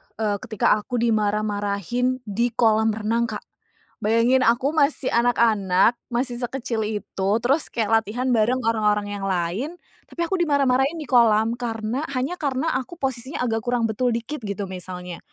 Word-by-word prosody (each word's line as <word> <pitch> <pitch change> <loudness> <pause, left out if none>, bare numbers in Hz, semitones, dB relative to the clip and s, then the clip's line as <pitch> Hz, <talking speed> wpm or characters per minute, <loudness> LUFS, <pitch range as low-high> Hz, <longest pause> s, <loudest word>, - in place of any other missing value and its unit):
eee, 205 -2 -1
ketika 215 - 0
aku 245 +4 -6
dimarah-marahin 215 +2 0
di 230 +3 0
kolam 220 -1 +3
renang 230 +2 0
Kak. - - -6 0.6
Bayangin 230 +4 +3
aku 245 +5 +2
masih 285 -3 +1
anak-anak, 225 -3 +3
masih 240 0 -2
sekecil 245 -2 -3
itu, 200 -2 -3
terus 275 +5 +1
kayak 225 -1 +2
latihan 245 +5 -4
bareng 240 +3 +2
orang-orang 210 -2 +1
yang 195 -1 -4
lain, 190 - -2 0.3
tapi 340 - -4
aku 380 +1 -1
dimarah-marahin 280 -1 +2
di 300 - -6
kolam 230 -2 +4
karena 225 +2 -3
hanya 260 +7 -1
karena 285 +1 -1
aku 260 +7 -8
posisinya 260 -1 -3
agak 225 -1 -1
kurang 240 -1 0
betul 245 +3 0
dikit 235 +4 -3
gitu 200 -1 -4
misalnya. 180 -1 -7
230 Hz, 150 wpm, -23 LUFS, 210-255 Hz, 0.6 s, kolam